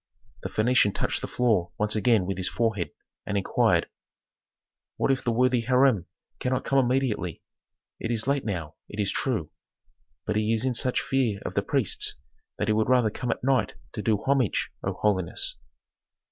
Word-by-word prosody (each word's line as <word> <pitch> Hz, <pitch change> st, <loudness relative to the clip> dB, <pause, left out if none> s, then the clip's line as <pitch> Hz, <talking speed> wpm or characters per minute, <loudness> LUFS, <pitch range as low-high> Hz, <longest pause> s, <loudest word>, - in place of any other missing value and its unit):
The -, -, -4 dB
Phœnician 110 Hz, -2 st, +3 dB
touched -, -, -1 dB
the -, -, -3 dB
floor 105 Hz, -9 st, +1 dB
once 105 Hz, +1 st, +1 dB
again 110 Hz, -3 st, +3 dB
with 95 Hz, +1 st, -3 dB
his 95 Hz, -1 st, -1 dB
forehead, 110 Hz, -4 st, 0 dB, 0.3 s
and 105 Hz, -, -2 dB
inquired, 100 Hz, -, +2 dB, 1.1 s
"What -, -, +2 dB
if 135 Hz, -, 0 dB
the 120 Hz, -, +1 dB
worthy 125 Hz, +1 st, +3 dB
Hiram 125 Hz, -5 st, +3 dB, 0.3 s
cannot 130 Hz, 0 st, 0 dB
come 135 Hz, -, +3 dB
immediately? 125 Hz, -, 0 dB, 0.6 s
It 115 Hz, -, -3 dB
is 115 Hz, -2 st, -1 dB
late 140 Hz, 0 st, +1 dB
now, 85 Hz, -8 st, -3 dB, 0.2 s
it 105 Hz, -, -8 dB
is 100 Hz, -1 st, +1 dB
true. 110 Hz, -, -1 dB, 0.7 s
But -, -, 0 dB
he 110 Hz, +1 st, +2 dB
is 115 Hz, +2 st, 0 dB
in 130 Hz, -, +1 dB
such 125 Hz, +2 st, 0 dB
fear 125 Hz, -7 st, 0 dB
of -, -, -3 dB
the -, -, +1 dB
priests -, -, 0 dB, 0.4 s
that 105 Hz, -, -1 dB
he 110 Hz, -, +3 dB
would 110 Hz, +2 st, +1 dB
rather 125 Hz, -4 st, +4 dB
come 125 Hz, -, -4 dB
at -, -, -2 dB
night 135 Hz, 0 st, +1 dB, 0.2 s
to 105 Hz, -, -4 dB
do 110 Hz, -1 st, +2 dB
homage, 135 Hz, 0 st, +1 dB
O -, -, -1 dB
holiness." 95 Hz, -5 st, 0 dB
115 Hz, 175 wpm, -26 LUFS, 105-125 Hz, 1.1 s, rather